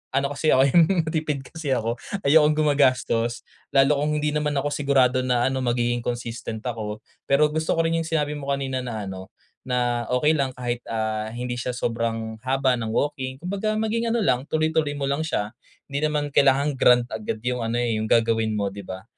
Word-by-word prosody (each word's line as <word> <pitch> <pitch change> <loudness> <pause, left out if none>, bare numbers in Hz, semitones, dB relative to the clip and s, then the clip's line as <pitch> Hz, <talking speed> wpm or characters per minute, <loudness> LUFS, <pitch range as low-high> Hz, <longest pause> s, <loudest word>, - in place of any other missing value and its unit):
ano 140 +1 +1
kasi 155 +2 0
ako 130 - +5
yung, 170 +2 +7 0.3
matipid 155 -3 -1
kasi 145 0 -3
ako, 115 0 -2 0.3
ayokong 150 0 +5
gumagastos, 130 -5 +2 0.3
lalo 135 +2 +5
kung 150 +1 0
hindi 150 - +1
naman 150 -1 -1
ako 140 +1 0
sigurado 135 -3 +2
na 125 0 +2
ano, 130 - -1
magiging 120 0 +1
consistent 115 -2 -4
ako. 110 -4 -4 0.3
Pero 150 +2 +4
gusto 160 0 0
ko 165 - +2
rin 165 0 +1
yung 165 - -3
sinabi 150 -2 0
mo 140 -1 -6
kanina 135 -1 -2
na 110 -4 -4
ano, 95 0 -8 0.4
na 120 -2 0
"Okay 125 +5 +3
lang 135 -4 -1
kahit, 120 -1 -3
ah, 110 -1 -2
hindi 120 +2 -4
siya 125 +1 -3
sobrang 115 -2 -2
haba 130 0 +2
ng 115 - -3
walking," 130 +1 -1
kumbaga 200 +4 -2
maging 220 +2 0
ano 230 -1 +1
lang 130 +1 +1
tuloy-tuloy 155 -2 0
mo 140 - -4
lang 140 +2 0
siya. 105 -8 -2 0.4
'Di 140 - -1
naman 150 -1 0
kailangang 140 +2 +3
grand 125 0 +6
agad 110 0 -4
yung 125 0 0
ano, 115 +1 -2
eh, 115 -3 0
yung 110 - -2
gagawin 115 -1 +2
mo, 100 -1 -1
'di 100 0 -8
ba? 95 0 -7
130 Hz, 195 wpm, -24 LUFS, 115-150 Hz, 0.4 s, yung